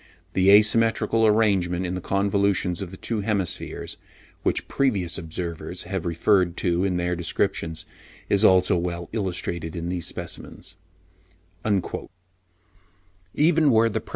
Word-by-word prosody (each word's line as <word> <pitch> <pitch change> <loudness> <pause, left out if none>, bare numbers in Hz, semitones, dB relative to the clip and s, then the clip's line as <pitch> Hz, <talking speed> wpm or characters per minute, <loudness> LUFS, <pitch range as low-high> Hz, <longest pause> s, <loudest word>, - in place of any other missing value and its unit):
The 95 0 +3
asymmetrical 110 +2 +4
arrangement 95 -5 +2
in 90 - -3
the 90 - -4
convolutions 100 -2 0
of 95 - -5
the 95 - -10
two 110 +1 -3
hemispheres, 100 -4 -2 0.4
which - - 0
previous 100 -11 0
observers 85 0 -5
have 90 -2 -4
referred 85 +1 +2
to 90 0 +1
in 95 -2 0
their 90 0 -1
descriptions, 85 -1 -2 0.4
is 100 +1 +2
also 95 -3 +5
well 85 0 -4
illustrated 90 -5 -3
in 85 0 -4
these 90 -2 -2
specimens" - - -7 0.9
(pp. 100 -4 -2
90 Hz, 115 wpm, -24 LUFS, 85-100 Hz, 0.9 s, also